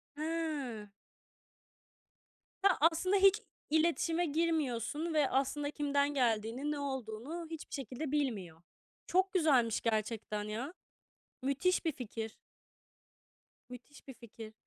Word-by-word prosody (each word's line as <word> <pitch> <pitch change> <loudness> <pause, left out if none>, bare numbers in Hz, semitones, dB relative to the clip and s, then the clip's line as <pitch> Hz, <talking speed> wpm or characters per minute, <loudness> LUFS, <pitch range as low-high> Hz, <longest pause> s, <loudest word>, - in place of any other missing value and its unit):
Hee. 300 -9 -3 1.7
Ya, 395 -3 +5
aslında 370 +4 +1
hiç 395 +3 +6 0.3
iletişime 330 +2 +2
girmiyorsun 315 -1 0
ve 295 -3 +3
aslında 285 +2 0
kimden 285 -1 +1
geldiğini, 240 +2 +1
ne 295 - -2
olduğunu 265 +4 -4
hiçbir 320 -1 -7
şekilde 270 +2 -4
bilmiyor. 200 - -1 0.5
Çok 375 +1 +2
güzelmiş 265 - +3
gerçekten 215 -1 -1
ya. 230 +10 -4 0.7
Müthiş 280 +8 +1
bir 325 - +1
fikir. 225 -3 -6 1.4
Müthiş 250 +4 -12
bir 265 - -7
fikir. 225 -2 -11
280 Hz, 100 wpm, -34 LUFS, 230-320 Hz, 1.7 s, hiç